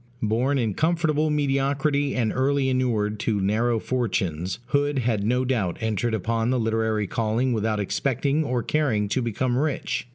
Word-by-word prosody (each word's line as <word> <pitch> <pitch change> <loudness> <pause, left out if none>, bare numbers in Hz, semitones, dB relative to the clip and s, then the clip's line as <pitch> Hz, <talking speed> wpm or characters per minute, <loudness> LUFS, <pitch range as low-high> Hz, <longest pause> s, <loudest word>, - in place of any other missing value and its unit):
Born 120 +6 +1
in 115 -5 0
comfortable 155 - +1
mediocrity, 140 0 +1
and 115 -4 0
early 135 +1 +1
inured 110 -5 0
to 105 -2 0
narrow 110 +4 +1
fortunes, 95 -8 -2
Hood 145 +1 +1
had 115 -5 0
no 125 +4 +1
doubt 110 -9 -1
entered 110 +1 -1
upon 115 +3 -1
the 130 0 +1
literary 110 -1 0
calling 115 +5 0
without 110 -1 0
expecting 140 +8 0
or 125 -4 -1
caring 120 -9 +1
to 130 - 0
become 120 +2 -1
rich. 145 -4 -2
120 Hz, 155 wpm, -24 LUFS, 110-135 Hz, -, Born